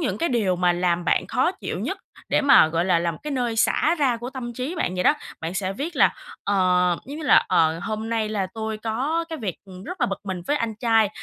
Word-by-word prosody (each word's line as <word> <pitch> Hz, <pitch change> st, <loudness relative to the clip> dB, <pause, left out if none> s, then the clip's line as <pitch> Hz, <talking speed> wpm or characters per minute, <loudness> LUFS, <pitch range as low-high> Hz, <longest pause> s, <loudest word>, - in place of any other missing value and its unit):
những 295 Hz, -, -1 dB
cái 335 Hz, -, 0 dB
điều 210 Hz, -8 st, +1 dB
mà 180 Hz, 0 st, +3 dB
làm 175 Hz, 0 st, 0 dB
bạn -, -, +1 dB
khó -, -, +1 dB
chịu -, -, -5 dB
nhất -, -, -3 dB, 0.3 s
để -, -, +2 dB
mà, 280 Hz, -, +6 dB
gọi 165 Hz, +2 st, 0 dB
là, 180 Hz, -3 st, +3 dB
là 170 Hz, 0 st, 0 dB
một -, -, -10 dB
cái 300 Hz, -, -5 dB
nơi 245 Hz, -4 st, -1 dB
xả 315 Hz, +8 st, +3 dB
ra 255 Hz, -5 st, +2 dB
của 240 Hz, +2 st, -6 dB
tâm 240 Hz, -3 st, -6 dB
trí 260 Hz, +8 st, -4 dB
bạn 185 Hz, -, -1 dB
vậy 180 Hz, -, -1 dB
đó. -, -, +5 dB, 0.3 s
Bạn 165 Hz, +3 st, -4 dB
sẽ 190 Hz, 0 st, -1 dB
viết 295 Hz, -, -5 dB
là, -, -, +4 dB, 0.3 s
ờ, 200 Hz, 0 st, +1 dB, 0.5 s
giống 285 Hz, +2 st, -7 dB
như -, -, -6 dB
là, -, -, +5 dB
ờ: 160 Hz, 0 st, +3 dB
"Hôm 220 Hz, +4 st, -4 dB
nay 220 Hz, -2 st, 0 dB
là 200 Hz, -3 st, -1 dB
tôi 220 Hz, -1 st, -4 dB
có 265 Hz, +10 st, -1 dB
cái 320 Hz, -2 st, -5 dB
việc 195 Hz, -7 st, -4 dB, 0.3 s
rất 365 Hz, -2 st, -7 dB
là -, -, +3 dB
bực 195 Hz, -, -4 dB
mình 185 Hz, -3 st, -4 dB
với 295 Hz, -, +1 dB
anh 230 Hz, -4 st, -2 dB
trai, 225 Hz, -2 st, +3 dB
220 Hz, 255 wpm, -23 LUFS, 185-260 Hz, 0.5 s, mà